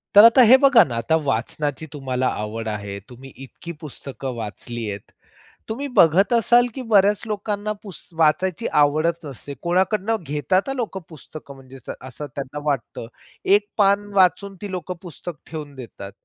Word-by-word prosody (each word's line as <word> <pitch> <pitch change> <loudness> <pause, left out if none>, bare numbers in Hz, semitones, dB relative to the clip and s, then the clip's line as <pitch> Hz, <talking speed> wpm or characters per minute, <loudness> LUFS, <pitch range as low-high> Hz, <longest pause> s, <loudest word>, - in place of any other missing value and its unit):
तर 205 - +10
आता 230 +3 +7
हे 260 - +9
बघा 265 -5 +6
ना, 125 -8 -5
आता 160 +8 +1
वाचनाची 145 +3 -2
तुम्हाला 130 -3 -2 0.2
आवड 110 +1 -5
आहे. 100 -2 -5
तुम्ही 130 +2 -12
इतकी 170 +5 -10
पुस्तकं 135 -3 -7
वाचली 115 +1 -6
आहेत. 100 -1 -8 0.6
तुम्ही 275 +6 -3
बघत 185 +7 +5
असाल 240 +1 +5
की 265 - -4
बऱ्याच 205 0 +4
लोकांना 210 0 -2
पुस 195 -6 -11
वाचायची 180 +6 +2
आवडच 155 +3 +2
नसते. 140 0 -8
कोणाकडून 190 +5 +1
घेतात 155 - 0
लोकं 225 -6 -3
पुस्तक 155 -2 -12
म्हणजे 135 -1 -13 0.2
असं 130 +3 -8
त्यांना 140 +1 -5
वाटतं. 135 -5 -3 0.4
एक 205 +1 +4
पान 200 0 +3
वाचून 195 +1 +2
ती 205 -2 -6
लोकं 180 0 -5
पुस्तक 175 -2 -8
ठेवून 150 -3 -8
देतात. 115 -6 -9
160 Hz, 150 wpm, -22 LUFS, 135-200 Hz, 0.6 s, तर